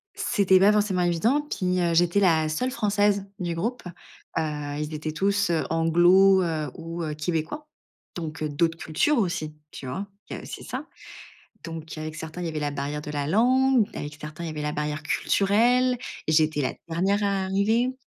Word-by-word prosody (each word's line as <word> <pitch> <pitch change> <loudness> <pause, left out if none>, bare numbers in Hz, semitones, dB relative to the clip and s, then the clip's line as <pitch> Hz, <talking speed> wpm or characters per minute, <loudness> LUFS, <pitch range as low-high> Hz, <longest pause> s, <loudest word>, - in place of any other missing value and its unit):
C'était 200 - +3
pas 200 +2 +6
forcément 205 -3 +1
évident. 175 - +2
Puis 185 -11 -1
heu, 170 -1 +1
j'étais 175 +3 +3
la 160 -5 +3
seule 250 +12 -1
française 205 -4 +1
du 175 -2 -2
groupe, 230 +9 -3 0.5
heu, - - +3 0.4
ils 150 +1 -4
étaient 155 +1 -3
tous, 200 +4 +1
heu, 165 -2 +1
anglosaxons 175 +4 +5
heu, 155 -5 -2
ou 165 +1 -6
heu, 155 -1 -3
québécois, 160 - -3 0.5
donc 160 -3 -5
heu, 155 - -1
d'autres 165 +3 0
cultures 170 - +1
aussi. 170 -6 -2 0.2
Tu - - -9
vois, 190 +11 -4 0.2
il - - -5
y - - -7
a - - -11
c'est - - -8
ça. - - -5 0.8
Donc, 165 -1 -7
avec 155 0 -6
certains, 160 +2 -6
il - - -2
y - - -1
avait 155 -1 -3
la 145 -1 -2
barrière 145 +1 -3
de 150 - -6
la 145 -1 -2
langue. 255 +4 +4
Avec 150 +1 -6
certains, 150 +2 -7
il - - -3
y - - -4
avait 150 -1 -5
la 150 0 -2
barrière 150 0 -3
culturelle 240 +10 +2 0.3
et 155 - +1
j'étais 155 -1 +3
la 130 - -1
dernière 190 +5 +1
à 200 -1 +1
arriver. 215 +6 +1
170 Hz, 195 wpm, -25 LUFS, 155-200 Hz, 0.8 s, pas